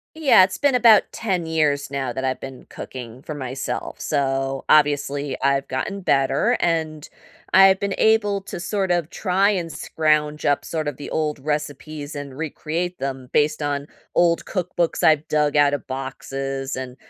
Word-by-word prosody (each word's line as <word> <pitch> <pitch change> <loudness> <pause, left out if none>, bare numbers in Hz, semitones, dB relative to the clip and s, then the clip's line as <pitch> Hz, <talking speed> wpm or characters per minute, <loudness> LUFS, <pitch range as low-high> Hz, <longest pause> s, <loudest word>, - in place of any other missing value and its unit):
Yeah. 290 -11 +6
It's 185 0 +1
been 285 -2 +2
about 230 -4 +7
10 185 -7 -2
years 150 -3 +1
now 135 -3 -3
that 130 +1 -4
I've 130 -1 -1
been 135 -1 -9
cooking 125 -1 -9
for 155 - -7
myself, 130 -2 -5
so, 135 -2 -1
obviously, 145 -2 +2
I've 140 0 +1
gotten 130 +10 -3
better, 135 -7 +2
and 160 -3 -1 0.4
I've 190 0 +7
been 200 -1 -2
able 205 -2 +2
to - - -7
sort 190 +2 -2
of 175 -3 0
try 195 +1 +1
and 175 -5 -2
scrounge 150 -1 0
up 145 - +1
sort 155 -2 -3
of 145 - -4
the 145 - -8
old 150 -2 -1
recipes 150 +1 -4
and 140 -2 -7
recreate 165 +3 -3
them 135 -1 -5
based 150 0 +2
on 145 0 -2 0.3
old 170 -1 +3
cookbooks 175 -3 -2
I've 155 -1 +4
dug 150 -1 +1
out 145 -1 +4
of 145 - -5
boxes, 135 0 -4
and 130 -1 -6
150 Hz, 165 wpm, -22 LUFS, 135-175 Hz, 0.4 s, about